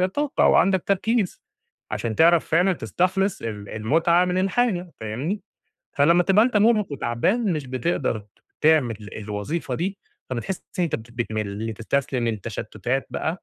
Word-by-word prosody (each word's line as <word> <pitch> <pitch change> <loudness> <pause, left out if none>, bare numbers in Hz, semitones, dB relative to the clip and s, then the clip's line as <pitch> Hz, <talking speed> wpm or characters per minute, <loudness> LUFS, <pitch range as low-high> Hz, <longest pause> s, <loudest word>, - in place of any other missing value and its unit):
طاقة 290 -1 +1
أو - - +5
عندك 190 -2 +3
تركيز 200 +1 0 0.5
عشان 115 -2 -2
تعرف 170 +3 +5
فعلًا 180 +4 +3
تستخلص 185 - 0
ال 105 -3 -6
المُتعة 165 +11 +2
من 180 0 -1
الحاجة 190 -2 0
فاهمني، 130 - -3 0.5
فلمّا 170 +5 +4
تبقى 195 +4 +4
أنت 240 -3 +1
مُرهّق 210 -4 +3
وتعبان 175 - 0
مش 150 -4 -3
بتقدر 130 -4 -1 0.4
تعمل 150 -8 +3 0.2
الوظيفة 105 +10 -4
دي، 190 +4 -3 0.3
فبتحس 130 - -3 0.2
إن 180 - +3
أنت 165 - -1
بت 110 +1 -12
بتمِل، 110 -2 -3
تستسلم 125 +1 -1
للتشتُّتات 115 +4 -3
بقى 165 +4 -3
160 Hz, 140 wpm, -24 LUFS, 115-190 Hz, 0.5 s, أو